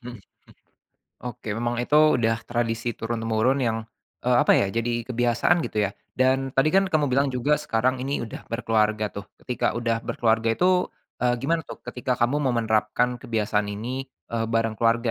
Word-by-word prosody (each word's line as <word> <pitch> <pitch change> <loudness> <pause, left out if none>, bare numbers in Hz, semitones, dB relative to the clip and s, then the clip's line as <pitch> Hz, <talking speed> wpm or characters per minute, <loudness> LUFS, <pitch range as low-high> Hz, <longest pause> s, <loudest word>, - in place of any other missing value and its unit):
mhm, 120 -1 -8 1.1
oke 115 - -9
memang 120 +1 -1
itu 145 - -1 0.2
udah 115 -1 +1
tradisi 120 0 -1
turun-temurun 115 +3 0
yang, 115 -3 0 0.5
eee, 125 0 +3
apa - - +5
ya 100 - +3
jadi 115 0 -1
kebiasaan 120 +7 +2
gitu 155 - -5
ya 100 - -1 0.3
dan 130 +1 +2
tadi 135 +3 +4
kan 195 0 +4
kamu 155 -5 +2
bilang 140 +1 +3
juga 130 +3 0
sekarang 130 -2 0
ini 135 -1 -2
udah 110 - -8
berkeluarga 110 -2 +1
tuh 100 - -8 0.2
ketika 125 - -1
udah 115 -1 0
berkeluarga 115 -1 +1
itu, 180 0 +3 0.3
eee, 125 0 +2
gimana 145 +7 0
tuh - - -7
ketika 125 0 -2
kamu 120 +4 +1
mau 125 - 0
menerapkan 115 +2 +1
kebiasaan 105 -3 -1
ini, 125 +6 -4 0.2
eee, 115 -1 0
bareng 115 0 +1
keluarga 115 +1 +2
120 Hz, 165 wpm, -25 LUFS, 115-130 Hz, 1.1 s, apa